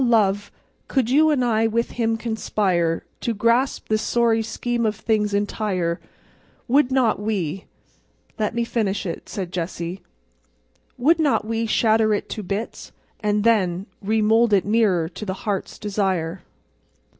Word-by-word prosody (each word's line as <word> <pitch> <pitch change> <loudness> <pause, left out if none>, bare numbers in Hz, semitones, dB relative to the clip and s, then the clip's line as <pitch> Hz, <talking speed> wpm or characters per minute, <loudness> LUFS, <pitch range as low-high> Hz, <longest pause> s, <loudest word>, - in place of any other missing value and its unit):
Love, 205 -4 +2 0.4
could 250 -3 0
you 310 +3 +5
and 270 -5 +2
I 225 -1 +2
with 230 +1 -1
Him 225 -1 0
conspire 195 -7 0
To 235 - -2
grasp 235 +5 +1
this 215 0 +1
sorry 230 -1 +2
Scheme 235 +2 -2
of 215 -1 +1
Things 215 -1 0
entire 200 -4 -1 0.7
Would 270 +1 +3
not 255 -6 +2
we—'" 195 -4 -2 0.7
"Let 215 +1 -1
me 235 - +1
finish 215 -5 -1
it," 170 - -5
said 190 -5 -4
Jessie. 175 0 -4 1.0
"'Would 305 +7 +3
not 290 -8 +2
we 225 +1 -1
shatter 220 -1 +3
it - - -5
to 215 - -4
bits—and 205 +1 -4
then 195 -5 +2 0.2
Remould 220 +2 +3
it 195 - +4
nearer 205 -6 +2
to 180 +5 -9
the 190 -2 -3
Heart's 200 -3 -2
Desire! 190 -4 -1
215 Hz, 140 wpm, -22 LUFS, 195-230 Hz, 1.0 s, you